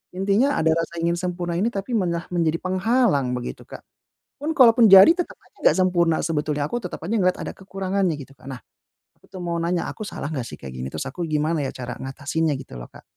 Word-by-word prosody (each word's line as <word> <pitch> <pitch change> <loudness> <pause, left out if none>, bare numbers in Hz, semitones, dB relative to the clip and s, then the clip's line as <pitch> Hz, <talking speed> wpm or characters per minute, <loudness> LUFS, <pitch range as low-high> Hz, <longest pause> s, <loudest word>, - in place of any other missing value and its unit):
intinya 200 +9 +2
ada 160 0 +3
rasa 165 0 -3
ingin 170 +1 +1
sempurna 175 -2 -3
ini 210 +5 +1
tapi 200 +4 -5
malah 170 -3 -1
menjadi 165 -2 +1
penghalang 185 - +1
begitu, 120 - -6
Kak. - - -10 0.6
Pun 310 +2 -1
kalaupun 235 -3 +7
jadi 195 +9 +10
tetep 355 -1 -4
aja - - -30
enggak - - +4
sempurna 175 -3 +2
sebetulnya 150 -2 -1
aku 240 - -2
tetep 180 - -5
aja 185 +7 -4
ngeliat 185 -2 +2
ada - - -5
kekurangannya 190 -3 -2
gitu, 135 0 -11
Kak. - - -18
Nah, 135 - -5 0.6
aku - - -37
tuh 185 - -7
mau 170 -1 -2
nanya 170 +1 -1
aku - - -7
salah 150 - -5
nggak 130 -5 -3
sih - - -9
kayak 65 -1 -8
gini? 65 +1 -4
Terus 80 - -4
aku 170 +6 -5
gimana 155 +1 0
ya - - -3
cara 125 -1 -6
ngatasinnya 145 +4 -2
gitu 65 - -11
loh, - - -10
Kak. - - -15
170 Hz, 220 wpm, -23 LUFS, 150-195 Hz, 0.6 s, jadi